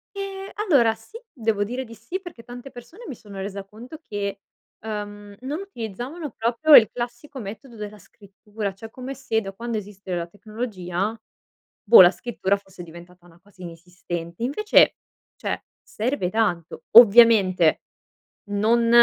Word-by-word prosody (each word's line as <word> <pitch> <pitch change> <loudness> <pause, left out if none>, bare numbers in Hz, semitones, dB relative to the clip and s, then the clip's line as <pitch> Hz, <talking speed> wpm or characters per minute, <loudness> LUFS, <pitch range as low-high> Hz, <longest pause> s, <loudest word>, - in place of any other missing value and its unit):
Ehm, 390 0 -6 0.2
allora 235 -8 +5
sì, 440 - -13 0.2
devo 220 -4 0
dire 250 +5 -4
di 230 -2 -12
sì 235 - -6
perché 350 -11 -11
tante 245 +3 -10
persone, 245 - -13
mi 275 - -6
sono 205 -3 -12
resa 200 0 -5
conto 230 +9 -11
che, 200 -6 -5 0.4
uhm, 205 -1 -6
non 285 +5 -4
utilizzavano 270 - -7
proprio 240 +8 +4
il 220 -4 +8
classico 245 +4 -6
metodo 225 +3 -9
della 210 -1 -8
scrittura, 205 +1 -8
cioè 210 +4 -10
è - - -20
come 255 +3 -7
se 255 -4 -1
da 195 -2 -7
quando 230 +2 -4
esiste 200 -2 -7
la 170 -1 -3
tecnologia, 205 0 -4 0.6
boh, 225 -1 +9
la 175 -1 +8
scrittura 200 -3 -1
fosse 195 -3 -13
diventata 175 +1 -14
una 170 -1 -20
cosa 195 -1 -20
inesistente. 170 +1 -7
Invece, 355 - +4 0.4
cioè, - - -4 0.2
serve 225 -4 -2
tanto. 185 -6 -1
Ovviamente, 210 -7 +7 0.7
non 225 +3 +2
220 Hz, 150 wpm, -23 LUFS, 195-245 Hz, 0.7 s, boh